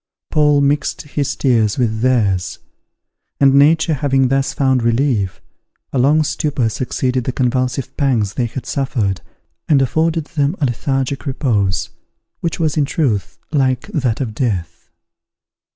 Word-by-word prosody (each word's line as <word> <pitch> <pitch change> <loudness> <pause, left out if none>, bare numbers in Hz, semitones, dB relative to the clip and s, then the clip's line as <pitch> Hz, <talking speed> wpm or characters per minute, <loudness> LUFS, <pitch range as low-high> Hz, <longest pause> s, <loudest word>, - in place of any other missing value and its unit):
Paul 150 -1 +3
mixed 140 0 0
his 145 -1 -2
tears 115 -7 +1
with 110 -4 0
theirs; 105 -8 +1 0.8
and 135 -1 +5
nature 160 +4 +4
having 135 -2 +1
thus 135 0 +1
found 130 -2 +1
relief, 115 -7 0 0.5
a 135 - +1
long 150 +5 +4
stupor 145 -5 -1
succeeded 125 +2 -2
the - - 0
convulsive 130 +1 -1
pangs 120 -9 +1
they 120 - -1
had 125 +2 -7
suffered, 110 -10 -1 0.5
and 145 -3 +5
afforded 160 +4 +1
them 145 +2 -1
a 150 - +2
lethargic 135 +3 -2
repose, 105 -9 0 0.5
which 170 0 -3
was 160 -2 0
in 145 - +3
truth, 130 - -1
like 130 -4 +1
that 125 -7 -1
of 120 -6 -3
death. 90 - -3
130 Hz, 135 wpm, -18 LUFS, 115-145 Hz, 0.8 s, and